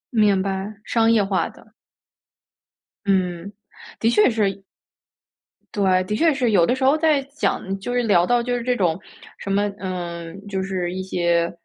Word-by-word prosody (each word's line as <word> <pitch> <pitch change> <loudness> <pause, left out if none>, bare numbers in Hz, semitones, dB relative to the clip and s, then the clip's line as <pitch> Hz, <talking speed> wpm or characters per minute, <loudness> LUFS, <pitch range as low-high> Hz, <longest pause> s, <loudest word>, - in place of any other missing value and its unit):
明 205 -3 +3
白， 195 +2 -4
商 225 -1 +2
业 220 -3 +4
化 195 -1 0
的。 - - -19 1.3
嗯， 185 -1 0 0.5
的 225 - +2
确 225 -1 +4
是 200 -4 -1 1.1
对， 190 -3 +2
的 210 +3 -3
确 325 +7 +3
是 255 -5 0
有 175 -5 +4
的 250 - +2
时 260 - -4
候 275 +3 +5
在 310 -2 +3 0.2
讲 195 -8 -2
就 195 - -5
是 245 0 +1
聊 180 -6 +3
到 240 -1 +2
就 245 0 -1
是 245 - -2
这 250 +1 0
种 175 -6 +1 0.4
什 195 - -5
么， 205 +1 +2
嗯， 175 -1 -5
就 190 -1 -2
是 185 -2 -3
一 190 - -4
些 170 -2 0
195 Hz, 180 characters per minute, -22 LUFS, 185-230 Hz, 1.3 s, 候